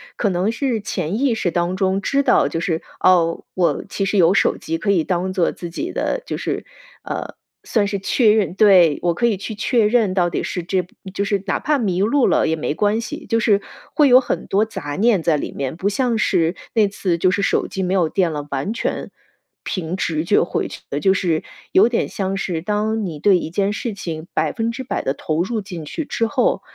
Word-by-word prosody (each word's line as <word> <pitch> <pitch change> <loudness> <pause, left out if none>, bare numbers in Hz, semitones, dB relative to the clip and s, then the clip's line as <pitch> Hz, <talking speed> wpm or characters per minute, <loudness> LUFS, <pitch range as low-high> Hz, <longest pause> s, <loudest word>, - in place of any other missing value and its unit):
可 210 - 0
能 185 +2 0
是 235 0 -1
潜 200 -1 -3
意 265 -4 +2
识 180 -5 -1
当 175 +2 0
中 190 0 +1
知 275 +7 +1
道， - - +4
就 165 - -3
是， 165 -2 -1 0.2
噢， 170 -2 +3
我 180 -2 +1
其 195 - -2
实 200 +2 0
有 175 -1 +5
手 - - +2
机 165 +1 -3
可 200 +4 0
以 175 -5 +2
当 185 +2 -1
做 180 -3 +1
自 175 - -7
己 315 - -4
的， - - -2
就 - - -4
是， - - -3 0.4
呃， - - -5 0.3
算 215 -3 +1
是 200 0 -2
确 215 +3 +3
认 210 -5 +1
对， 185 -7 +6
我 175 -1 +1
可 235 - 0
以 230 -3 +2
去 200 +3 -6
确 215 +1 +2
认 215 -4 +2
到 180 -2 +2
底 - - -2
是 180 - -4
这， 180 +1 -1 0.3
就 200 - -1
是 200 -1 -1
哪 - - 0
怕 300 -1 +1
迷 190 -7 0
路 245 +6 +3
了 - - +2
也 160 - +1
没 150 -2 -2
关 210 +6 +1
系， - - -7
就 230 - +1
是 205 -2 +3 0.3
会 300 -2 +5
有 255 0 +7
很 245 - -3
多 200 +2 +2
杂 145 -9 -5
念 215 -2 +3
在 160 -1 +2
里 150 - -3
面， 135 +1 -4
不 190 +4 -1
像 235 +2 0
是 180 -5 +1 0.2
那 220 -3 +4
次 190 -3 -1
就 185 +2 +3
是 195 +2 0
手 - - +1
机 190 - -3
没 180 +1 0
有 180 -4 +3
电 175 +1 +1
了， 145 -1 -5
完 140 +10 -2
全， - - -3 0.5
凭 175 -2 -3
直 155 -2 -1
觉 205 - +4
回 175 - -2
去 - - -9
的。 145 - -1
就 190 +6 +3
是 175 -5 0 0.3
有 205 +5 +5
点 240 - 0
像 195 0 -3
是 175 -4 -2
当 210 +3 -1
你 165 -5 -5
对 195 +4 +4
一 160 - -5
件 200 +4 0
事 225 +1 -3
情 165 -5 -6
百 155 -1 +1
分 230 -1 -1
之 260 +3 -6
百 255 - -2
地 - - 0
投 155 +1 -1
入 225 +4 -2
进 180 -5 -7
去 300 - -4
之 230 -4 -1
后， 250 +2 +1
195 Hz, 250 characters per minute, -20 LUFS, 170-220 Hz, 0.5 s, 有